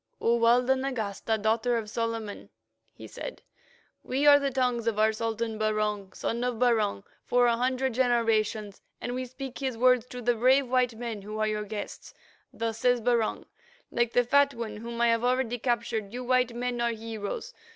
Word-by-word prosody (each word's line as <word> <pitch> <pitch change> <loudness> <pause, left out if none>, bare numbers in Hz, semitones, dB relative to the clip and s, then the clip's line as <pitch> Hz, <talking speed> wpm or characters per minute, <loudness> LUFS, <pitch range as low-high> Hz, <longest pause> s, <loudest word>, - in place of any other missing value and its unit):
"O, 235 +1 +2
Walda 245 +3 +4
Nagasta, 225 -5 -2
Daughter 225 +3 +1
of 220 -2 -4
Solomon," 225 -1 -4 0.4
he - - -12
said, - - -8 0.6
"we 270 +3 -1
are 290 0 +8
the 280 -1 0
tongues 250 -3 0
of 225 -2 0
our 220 +1 +3
Sultan 225 0 -3
Barung, 210 -2 -1
Son 235 +4 -3
of 250 -1 0
Barung 220 -5 +1 0.2
for 245 0 +3
a 235 -1 +3
hundred 255 +1 0
generations, 225 -4 +1 0.2
and 245 - -4
we 255 +1 -3
speak 255 0 -8
his 260 -4 -2
words 250 0 +4
to 250 - -8
the 245 0 +2
brave 255 +4 +3
white 250 -2 +1
men 230 -2 -5
who 210 +2 -7
are 215 - +1
your 210 0 -2
guests. 210 0 -7 0.4
Thus 225 -1 -3
says 245 -1 +3
Barung. 230 -1 0 0.5
Like 240 -1 0
the 245 - +4
Fat 280 +2 +3
One 225 -3 -5
whom 235 +2 -6
I 235 - +4
have 230 0 +2
already 250 -1 +1
captured, 235 -4 -1
you 250 +2 -5
white 250 -1 +1
men 245 0 -2
are 235 - +2
heroes. 225 - -5
235 Hz, 180 wpm, -28 LUFS, 220-250 Hz, 0.6 s, are